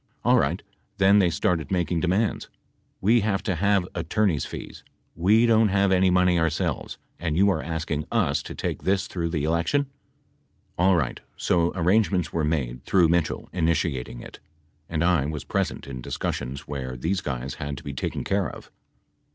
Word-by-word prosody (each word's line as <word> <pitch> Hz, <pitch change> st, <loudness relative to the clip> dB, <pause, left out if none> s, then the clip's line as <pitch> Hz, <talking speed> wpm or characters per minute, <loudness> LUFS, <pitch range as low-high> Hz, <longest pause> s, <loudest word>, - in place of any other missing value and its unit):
Alright, -, -, +3 dB, 0.3 s
then 100 Hz, +1 st, +5 dB
they 90 Hz, -3 st, +4 dB
started 80 Hz, -3 st, 0 dB
making 90 Hz, -2 st, 0 dB
demands. 95 Hz, +5 st, 0 dB, 0.5 s
"We 115 Hz, +5 st, +4 dB
have 100 Hz, -1 st, 0 dB
to 95 Hz, -, 0 dB
have 100 Hz, +1 st, +2 dB
attorneys 85 Hz, -, 0 dB
fees. -, -, -8 dB, 0.3 s
We 105 Hz, +8 st, +4 dB
don't 115 Hz, -1 st, +4 dB
have 100 Hz, 0 st, +2 dB
any 95 Hz, 0 st, +4 dB
money 90 Hz, -1 st, +3 dB
ourselves, 80 Hz, -1 st, -1 dB, 0.2 s
and 80 Hz, -2 st, -1 dB
you 100 Hz, +2 st, +5 dB
are 80 Hz, -, -1 dB
asking 80 Hz, -2 st, -3 dB
us -, -, +1 dB
to -, -, -8 dB
take -, -, -3 dB
this 95 Hz, +1 st, +1 dB
through 85 Hz, -4 st, -3 dB
the 80 Hz, -4 st, -2 dB
election." 85 Hz, -, 0 dB, 0.9 s
Alright 90 Hz, -2 st, +2 dB, 0.2 s
so 85 Hz, -1 st, +1 dB
arrangements 90 Hz, -1 st, +2 dB
were 80 Hz, -, 0 dB
made 65 Hz, -6 st, -2 dB
through 90 Hz, -4 st, +3 dB
Mitchell, 85 Hz, -2 st, 0 dB
initiating 80 Hz, -8 st, -1 dB
it. -, -, -11 dB, 0.5 s
And 80 Hz, -1 st, -1 dB
I 85 Hz, -5 st, +3 dB
was 75 Hz, -2 st, -4 dB
present -, -, -2 dB
in 65 Hz, -2 st, -7 dB
discus -, -, -2 dB
sions 70 Hz, +3 st, -6 dB
where 65 Hz, -3 st, -5 dB
these 90 Hz, +9 st, -1 dB
guys 65 Hz, -1 st, -4 dB
had 70 Hz, -1 st, -4 dB
to -, -, -10 dB
be 70 Hz, -, -5 dB
taken 65 Hz, -, -3 dB
care 100 Hz, -1 st, 0 dB
of. -, -, -12 dB
85 Hz, 165 wpm, -25 LUFS, 75-95 Hz, 0.9 s, then